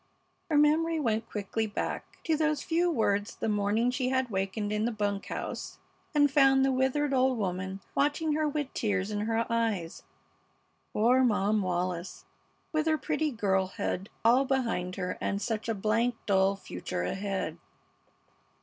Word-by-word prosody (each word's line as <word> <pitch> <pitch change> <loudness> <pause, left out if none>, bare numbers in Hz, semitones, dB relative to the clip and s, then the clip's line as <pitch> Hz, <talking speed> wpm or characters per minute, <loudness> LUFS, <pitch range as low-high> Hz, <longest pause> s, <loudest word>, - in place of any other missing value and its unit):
Her 305 - +3
memory 315 +2 +3
went 225 -5 -1
quickly 215 +2 -2
back 205 - -3 0.2
to 320 - +1
those 310 -1 0
few 345 +2 +1
words 205 -8 0
the - - -3
morning 210 +3 +1
she 255 0 -1
had 260 -2 0
wakened 195 +2 -2
in 210 +1 0
the 240 - 0
bunk 205 -2 -2
house - - -5 0.4
and 290 -1 +5
found 270 -2 +5
the 270 - +2
withered 265 +2 +1
old 260 -1 +3
woman 190 -1 -3
watching 300 +2 +1
her 310 0 +1
with 290 -2 -3
tears 200 -2 -1
in 205 - -2
her 230 0 +1
eyes. 225 -8 -1 0.9
Poor 245 +5 +4
Mom 210 -3 +2
Wallis, 180 -1 -3 0.5
with 310 0 0
her 315 0 +3
pretty 310 0 -1
girlhood 190 -4 -1 0.2
all 245 +4 +6
behind 230 -9 -1
her 180 - -3
and 200 - -1
such 220 +1 -3
a 225 - 0
blank, 225 +4 +1
dull 195 0 +3
future 90 - -5
ahead! 195 - -3
225 Hz, 155 wpm, -29 LUFS, 200-270 Hz, 0.9 s, all